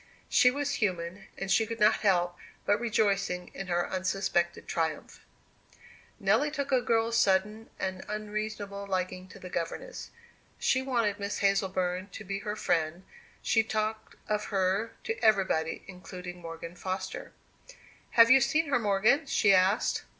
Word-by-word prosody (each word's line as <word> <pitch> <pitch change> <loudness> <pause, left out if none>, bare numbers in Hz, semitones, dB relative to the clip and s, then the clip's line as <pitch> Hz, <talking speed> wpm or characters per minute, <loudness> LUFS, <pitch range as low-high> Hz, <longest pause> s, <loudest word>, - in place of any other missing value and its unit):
She 250 - +6
was 280 0 -2
human, 185 -1 -2
and 195 0 -3
she 225 - +3
could 230 +1 -5
not 210 +1 +5
help 175 -4 +2 0.3
rejoicing 205 -4 +1
in 195 - -6
her 175 -1 0
unsuspected 185 -2 -1
triumph. 160 -2 -3 1.0
Nelly 295 - +3
took 280 -2 -3
a 255 -2 +4
girl's 230 -1 +1
sudden 210 +2 +1
and 190 0 -3
unreasonable 210 -1 -4
liking 185 -1 -2
to - - -13
the 180 - -10
governess. - - -4 0.5
She 260 - +2
wanted 230 -6 0
Miss 200 0 -3
Hazleburn 190 -1 0
to 220 - -7
be 195 0 -4
her 210 +1 -4
friend; 165 -2 0 0.4
she 225 - +3
talked 220 0 -3
of 210 0 -1
her 195 +3 0
to 455 - -4
everybody, 190 -7 +2
including 180 -1 -9
Morgan 165 0 -7
Foster. 185 +1 -5 0.9
"Have 230 0 +8
you 265 +1 +8
seen 305 +3 +2
her, 270 - +3
Morgan?" 215 +8 +2
she 205 -7 +4
asked. 190 +4 +2
200 Hz, 145 wpm, -29 LUFS, 185-225 Hz, 1.0 s, Have